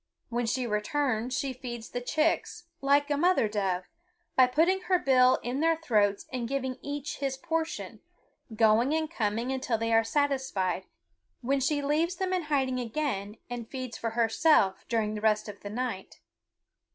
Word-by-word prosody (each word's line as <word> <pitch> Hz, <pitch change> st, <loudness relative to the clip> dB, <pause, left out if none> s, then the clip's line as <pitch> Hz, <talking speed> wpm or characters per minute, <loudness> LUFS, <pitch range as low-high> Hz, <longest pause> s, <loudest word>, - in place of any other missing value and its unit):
When 240 Hz, -1 st, -1 dB
she 250 Hz, +2 st, 0 dB
returns 240 Hz, +2 st, -1 dB
she 275 Hz, -2 st, -2 dB
feeds 240 Hz, -3 st, -7 dB
the 245 Hz, -, -3 dB
chicks, 310 Hz, +6 st, 0 dB, 0.2 s
like 285 Hz, +1 st, +3 dB
a 290 Hz, -, +2 dB
mother 345 Hz, -7 st, +3 dB
dove, 195 Hz, -4 st, -1 dB, 0.5 s
by 255 Hz, -1 st, +6 dB
putting 335 Hz, +9 st, +2 dB
her 370 Hz, -, +5 dB
bill 255 Hz, -5 st, +5 dB
in 250 Hz, +3 st, -2 dB
their 330 Hz, +1 st, +3 dB
throats 210 Hz, -10 st, +1 dB
and 245 Hz, -2 st, -2 dB
giving 260 Hz, -1 st, -3 dB
each 285 Hz, 0 st, -5 dB
his 270 Hz, -1 st, -2 dB
portion, 325 Hz, 0 st, -3 dB, 0.6 s
going 225 Hz, +6 st, +4 dB
and 315 Hz, 0 st, -1 dB
coming 230 Hz, -2 st, -1 dB
until 255 Hz, -3 st, -1 dB
they 230 Hz, +1 st, -1 dB
are 225 Hz, 0 st, +5 dB
satisfied, 245 Hz, -, -1 dB, 0.5 s
when 270 Hz, +3 st, +1 dB
she 285 Hz, +2 st, 0 dB
leaves 320 Hz, +5 st, +1 dB
them 375 Hz, 0 st, -2 dB
in 360 Hz, -3 st, -1 dB
hiding 265 Hz, -4 st, 0 dB
again 230 Hz, -5 st, -3 dB
and 240 Hz, -2 st, -6 dB
feeds 255 Hz, -3 st, -5 dB
for 230 Hz, -, -3 dB
herself 225 Hz, -4 st, +3 dB
during 220 Hz, -2 st, 0 dB
the 210 Hz, -, -5 dB
rest 215 Hz, 0 st, +2 dB
of 205 Hz, -1 st, -8 dB
the 205 Hz, -, -7 dB
night. 225 Hz, -3 st, -4 dB
255 Hz, 165 wpm, -29 LUFS, 225-290 Hz, 0.6 s, by